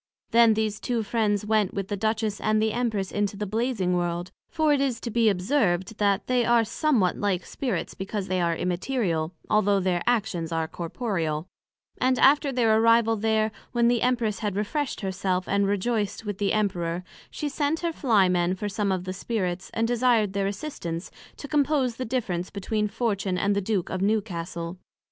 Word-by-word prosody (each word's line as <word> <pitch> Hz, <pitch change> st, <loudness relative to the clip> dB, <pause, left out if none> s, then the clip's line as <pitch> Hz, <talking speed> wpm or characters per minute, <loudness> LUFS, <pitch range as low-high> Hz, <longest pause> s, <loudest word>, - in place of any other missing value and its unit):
Then 230 Hz, -1 st, +6 dB
these 215 Hz, -1 st, -1 dB
two 235 Hz, -1 st, -1 dB
Friends 210 Hz, -2 st, 0 dB
went 215 Hz, -3 st, +1 dB
with 195 Hz, -1 st, -2 dB
the 205 Hz, -, -1 dB
Duchess 220 Hz, 0 st, -1 dB
and 215 Hz, 0 st, +2 dB
the 220 Hz, 0 st, +1 dB
Empress 220 Hz, -6 st, -1 dB
into 205 Hz, -1 st, -1 dB
the 210 Hz, -, -2 dB
Blazing 215 Hz, -3 st, 0 dB
World; 175 Hz, 0 st, -2 dB, 0.2 s
(for 310 Hz, -2 st, +2 dB
it 280 Hz, -, +2 dB
is 260 Hz, -4 st, 0 dB
to 235 Hz, -, -4 dB
be 230 Hz, 0 st, +4 dB
observed, 195 Hz, -1 st, 0 dB
that 200 Hz, -1 st, +2 dB
they 250 Hz, -1 st, +2 dB
are 235 Hz, 0 st, +4 dB
somewhat 230 Hz, -, +1 dB
like 190 Hz, -3 st, -1 dB
Spirits, 260 Hz, -4 st, -3 dB
because 195 Hz, 0 st, -4 dB
they 185 Hz, -2 st, 0 dB
are 170 Hz, -1 st, +1 dB
Immaterial, 175 Hz, -2 st, -1 dB, 0.2 s
although 205 Hz, -2 st, +3 dB
their 180 Hz, -2 st, 0 dB
actions 195 Hz, -8 st, 0 dB
are 165 Hz, -1 st, -1 dB
corporeal:) 170 Hz, -3 st, -3 dB, 0.5 s
and 255 Hz, 0 st, +2 dB
after 280 Hz, +2 st, +5 dB
their 225 Hz, -4 st, +3 dB
arrival 230 Hz, 0 st, +4 dB
there, 220 Hz, 0 st, +1 dB, 0.2 s
when 235 Hz, -1 st, +3 dB
the 240 Hz, -1 st, +2 dB
Empress 235 Hz, -5 st, +1 dB
had 205 Hz, -3 st, -2 dB
refreshed 265 Hz, +8 st, -2 dB
her 190 Hz, -2 st, -2 dB
self, 185 Hz, -1 st, -1 dB
and 200 Hz, 0 st, +2 dB
rejoiced 205 Hz, +1 st, -1 dB
with 205 Hz, -2 st, -4 dB
the 200 Hz, -1 st, +1 dB
Emperor, 180 Hz, -5 st, -1 dB, 0.3 s
she 300 Hz, -, -4 dB
sent 290 Hz, +2 st, -1 dB
her 340 Hz, -1 st, -1 dB
Fly 220 Hz, -11 st, +3 dB
men 180 Hz, 0 st, +1 dB
for 205 Hz, +2 st, -4 dB
some 205 Hz, 0 st, -1 dB
of 185 Hz, -1 st, -1 dB
the 185 Hz, 0 st, -4 dB
Spirits, 185 Hz, -3 st, -3 dB
and 225 Hz, 0 st, 0 dB
desired 235 Hz, -4 st, +2 dB
their 195 Hz, 0 st, 0 dB
assistance, 195 Hz, -, -5 dB, 0.3 s
to 285 Hz, -, -7 dB
compose 280 Hz, -4 st, +1 dB
the 255 Hz, -, -3 dB
difference 195 Hz, -8 st, -2 dB
between 210 Hz, +2 st, -1 dB
Fortune, 205 Hz, -4 st, -1 dB
and 200 Hz, +2 st, +1 dB
the 200 Hz, -, +1 dB
Duke 195 Hz, -2 st, -1 dB
of 185 Hz, -, -2 dB
Newcastle. 180 Hz, -4 st, -2 dB
210 Hz, 185 wpm, -26 LUFS, 185-235 Hz, 0.5 s, Then